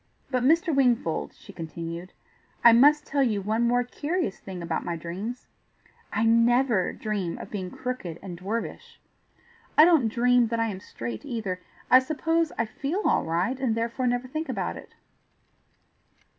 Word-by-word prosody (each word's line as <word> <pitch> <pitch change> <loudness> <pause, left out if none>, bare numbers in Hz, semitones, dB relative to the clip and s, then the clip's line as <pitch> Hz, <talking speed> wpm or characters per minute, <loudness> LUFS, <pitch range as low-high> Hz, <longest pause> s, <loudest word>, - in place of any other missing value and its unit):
"But, 255 -1 +1
Mr. 325 +5 +3
Wingfold," 240 -11 +1
she - - -14
continued. 170 +2 -6 0.5
"I 235 - +9
must 290 +6 +5
tell 280 0 0
you 225 -6 +2
one 215 +4 -1
more 245 +1 +2
curious 290 - -3
thing 185 -3 -7
about 165 -1 -2
my 170 - -3
dreams: 190 +9 -6 0.7
I 220 +2 +1
NEVER 230 -2 +3
dream 200 -6 -3
of - - -9
being 190 -3 -4
crooked 250 -11 -5
and 185 -3 -6
dwarfish. 230 - -5 0.8
I 310 - +10
don't 320 -9 +4
dream 245 +1 +3
that 230 0 -2
I 230 0 +1
am 190 -3 -5
straight 115 -10 -7
either; 195 -6 -4 0.3
I 255 - +10
suppose 320 +4 0
I 230 - +1
feel 285 - -3
all - - +2
right, 180 +11 -1
and 250 -4 0
therefore 235 +3 -1
never 245 +1 0
think 310 +5 -4
about - - -2
it. - - -12
230 Hz, 160 wpm, -26 LUFS, 190-260 Hz, 0.8 s, I